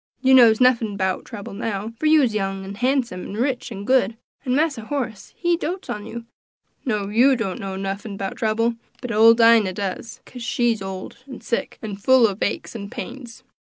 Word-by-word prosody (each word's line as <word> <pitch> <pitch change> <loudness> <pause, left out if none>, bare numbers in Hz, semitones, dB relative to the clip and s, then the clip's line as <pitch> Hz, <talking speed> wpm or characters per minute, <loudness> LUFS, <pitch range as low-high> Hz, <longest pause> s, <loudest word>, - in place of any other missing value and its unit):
You 265 +1 +4
knows 235 -4 +7
nuffin 235 -5 +3
'bout 190 -1 -1
trouble 205 -3 -8
now, 210 +1 -4
for 310 - +1
you's 295 -7 +4
young, 195 -2 -2
an' 195 - -7
handsome, 245 -4 0
an' - - -7
rich, 250 +1 -2
an' 200 -2 -7
good; 230 -4 +2 0.3
an' 255 -2 0
Massa 285 -7 0
Horace, 245 -6 -4
he 345 -1 +1
doats 355 +2 -4
on 210 +1 -6
you; 235 0 -7 0.6
no, 210 -6 -1
you 250 +6 +4
knows 200 -6 -3 0.2
nuffin 195 +1 -5
'bout 195 0 -4
trouble, 230 +2 +1 0.3
but 250 - -5
ole 225 +2 +7
Dinah 230 -4 +5
does, 200 +3 -5
kase 250 - -11
she's 235 -2 0
ole, 190 -1 -6 0.2
an' 260 -3 -9
sick, 235 - -3
an' 210 -3 -5
full 255 +4 +5
ob 200 -1 -6
aches 205 - -2
and 200 -3 -7
pains." 240 +3 -8
225 Hz, 190 wpm, -22 LUFS, 200-250 Hz, 0.6 s, knows